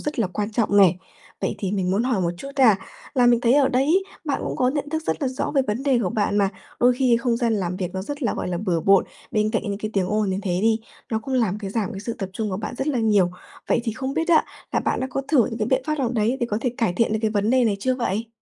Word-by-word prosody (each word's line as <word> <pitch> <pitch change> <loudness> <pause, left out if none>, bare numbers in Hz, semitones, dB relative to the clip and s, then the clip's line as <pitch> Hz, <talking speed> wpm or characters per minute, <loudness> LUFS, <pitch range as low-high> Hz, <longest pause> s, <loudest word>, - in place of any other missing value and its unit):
rất 295 -3 -4
là 225 - +2
quan 205 +4 -3
trọng 215 -2 +1
nè. 190 -3 +6 0.5
Vậy - - -1
thì 195 -1 -2
mình 190 -3 0
muốn 200 +4 +1
hỏi 245 -5 0
một 170 -2 +1
chút 275 - -7
nha, 235 -7 +6 0.4
là 250 -2 +4
mình 240 -1 +4
thấy 240 0 +3
ở 280 -2 +4
đấy 255 +1 +2
ấy, 350 +7 +3 0.2
bạn 280 -3 -1
cũng - - -3
có 250 - +2
nhận 290 +1 -2
thức 315 +1 -2
rất - - -1
là 270 - +1
rõ 255 - -3
về 270 - +4
vấn 210 +5 -2
đề 270 -3 +3
của 180 - -1
bạn 205 0 0
mà, 200 -1 +3 0.3
đôi 250 +1 +6
khi 250 -3 +4
không 235 0 0
gian 235 -1 +1
làm 180 -3 -2
việc 180 -2 -3
nó 190 - -2
rất 290 +7 -6
là, 235 - 0
gọi - - -3
là, 175 - -2
bừa 180 -4 0
bộn, 195 +2 +4 0.3
bên 215 -1 +1
cạnh 225 -1 0
những 200 -2 -3
cái 215 0 -4
tiếng 190 -2 +1
ồn 210 -2 +1
như 185 - -1
thế 180 -3 -1
đi, 225 0 +3 0.3
nó 220 - +1
cũng 260 +4 -4
làm 215 -6 +1
cái 200 -2 -5
giảm 220 +1 -2
cái 195 - -6
sự 230 +3 -4
tập 195 - -3
trung 215 +2 -3
của 185 - -2
bạn 210 +3 -5
rất 270 - -1
là 270 -5 0
nhiều. 205 -5 +3 0.4
Vậy - - +3
thì 225 - -1
không 265 +4 -4
biết 325 +1 -1
á 330 -2 +5 0.3
là - - +2
bạn - - -1
đã 260 - -1
có 275 - -2
thử 265 -8 +4
những 225 - -5
cái 215 - 0
biện 260 0 +2
pháp 305 -1 -1
nào 255 - +1
đấy 230 +3 +1
để 240 - +1
có 210 - 0
thể 250 - 0
cải 225 -7 +1
thiện 220 +4 +1
được 220 - +1
cái 220 - +2
vấn 210 +1 +1
đề 255 -1 +4
này 210 -3 +1
chưa 255 +3 +1
vậy? 230 -2 -2
225 Hz, 315 wpm, -23 LUFS, 200-255 Hz, 0.5 s, nè